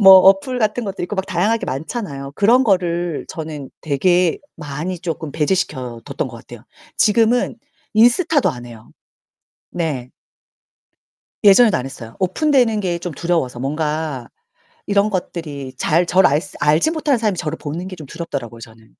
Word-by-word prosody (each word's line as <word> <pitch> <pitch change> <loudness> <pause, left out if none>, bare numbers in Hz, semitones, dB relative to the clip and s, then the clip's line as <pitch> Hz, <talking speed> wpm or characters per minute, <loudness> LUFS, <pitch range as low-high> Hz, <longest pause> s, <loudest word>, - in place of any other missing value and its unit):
뭐 195 -2 +10
어플 195 +7 +5
같은 220 +1 0
것도 195 -2 -5
있고 200 +3 -4
막 190 - -2
다양하게 220 +6 0
많잖아요. 140 - -5
그런 245 +6 +4
거를 175 -4 0
저는 155 -4 -7
되게 175 +4 +2 0.2
많이 155 +4 -5
쪼끔 165 -3 -4
배제시켜 135 -8 -1
뒀던 - - -3
것 - - -10
같아요. - - -13 0.3
지금은 230 +2 +3 0.4
인스타도 245 - +4
안 120 -4 -9
해요. 115 -2 -13 0.8
네. 150 -8 -3 1.3
예전에도 210 - +6
안 125 - -3
했어요. 115 -4 -9
오픈되는 235 - +2
게 180 -3 -1
좀 175 -1 -5
두려워서 155 -7 -1
뭔가 150 -2 -2 0.6
이런 200 +1 +2
것들이 150 -8 -5
잘 170 +3 +2
저를 185 +1 +5
알스 160 +7 -1
알지 155 - +3
못하는 300 -5 +1
사람이 210 -4 0
저를 155 +1 -3
보는 165 +5 -5
게 185 - -8
좀 155 -4 -10
두렵더라고요, 130 -8 -6
저는. 110 -1 -14
175 Hz, 325 characters per minute, -19 LUFS, 145-200 Hz, 1.3 s, 뭐